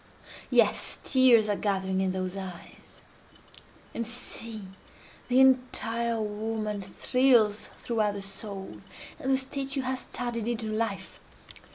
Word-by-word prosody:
Yes! - - +2
tears 250 -5 +5
are 205 - +1
gathering 190 -2 0
in 190 -1 +1
those 185 0 -3
eyes—and 190 +4 -11
see! 225 -3 -6 0.6
the 250 +1 +3
entire 235 -3 +2
woman 215 0 -3
thrills 220 +1 +3
throughout 215 -3 0
the 200 - -4
soul, 195 -1 -7 0.4
and 265 - -3
the 265 - +4
statue 270 +1 -2
has 260 0 -2
started 235 -3 -4
into 235 -1 -2
life! 215 -3 -3
220 Hz, 110 wpm, -28 LUFS, 200-245 Hz, 0.6 s, tears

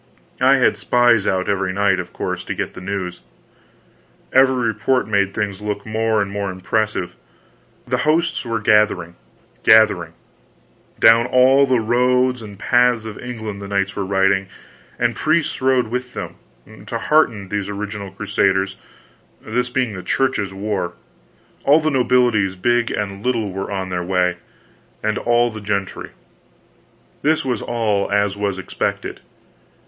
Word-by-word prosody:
I - - +6
had - - +2
spies 120 -4 +3
out 95 0 0
every 95 -2 0
night, 100 -1 +1
of 90 -1 -6
course, - - -4
to - - -4
get - - -4
news. 90 -1 -5 1.1
Every 130 -2 +4
report 120 +4 0
made 100 -2 +1
things 100 -1 -3
look 105 -1 -4
more 110 -1 0
and 100 - -6
more 100 -1 -3
impressive. 95 +1 -2 0.7
The 125 0 0
hosts 160 +3 +1
were 115 -2 -2
gathering, 105 -5 +2 0.5
gathering; 105 -7 +4 0.9
down 115 +2 +6
all 130 +2 +5
the 130 -2 +2
roads 125 +2 +2
and 105 -2 -10
paths 120 +1 +2
of 110 -2 -7
England 110 -5 -6
the 100 - -7
knights 100 0 -1
were 100 - -2
riding, 95 0 +1 0.5
and - - 0
priests 155 -2 0
rode 130 -3 +2
with 125 +1 -4
them, - - -6 0.5
to - - -3
hearten 115 -11 +1
these 100 -1 -3
original 105 -1 -5
Crusaders, 95 -1 0 0.6
this 125 +3 -2
being 125 -3 -1
the 95 - -6
Church's 105 -4 0
war. 95 -3 -3 0.7
All 145 +3 +5
the 155 0 0
nobilities, 120 -7 +2
big 120 +3 +2
and 100 -1 -4
little, 115 -5 -1
were 95 +1 -5
on 95 -2 -3
their 90 -1 -2
way, 90 -1 0 0.7
and 110 -1 0
all 120 0 +2
the 110 -1 -8
gentry. 100 -2 -3 1.1
This 155 0 +1
was 125 -5 -1
all 105 -4 -1
as 100 -1 +1
was 100 -2 -2
expected. 95 - -4
105 Hz, 145 wpm, -20 LUFS, 100-125 Hz, 1.1 s, I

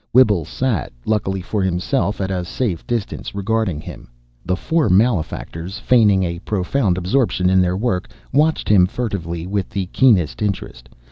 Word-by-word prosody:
Whibble 105 - +5
sat, 115 - -2
luckily 95 -3 0
for 100 +3 -2
himself, 95 +5 0
at 95 0 -1
a 90 -1 -1
safe 90 -1 -3
distance, 115 -4 -3
regarding 100 -4 -1
him. - - -10 0.3
The 90 - 0
four 160 - 0
malefactors, 90 -3 0
feigning 105 -6 +4
a 85 -1 -3
profound 95 +1 0
absorption 95 -1 +1
in 95 0 +5
their 90 0 +1
work, 100 -4 -1 0.2
watched 155 +3 +2
him 95 -4 +5
furtively 90 -7 -4
with 100 0 -2
the 95 -2 -2
keenest 90 - +3
interest. 100 -12 -4
95 Hz, 150 wpm, -20 LUFS, 90-115 Hz, 0.3 s, Whibble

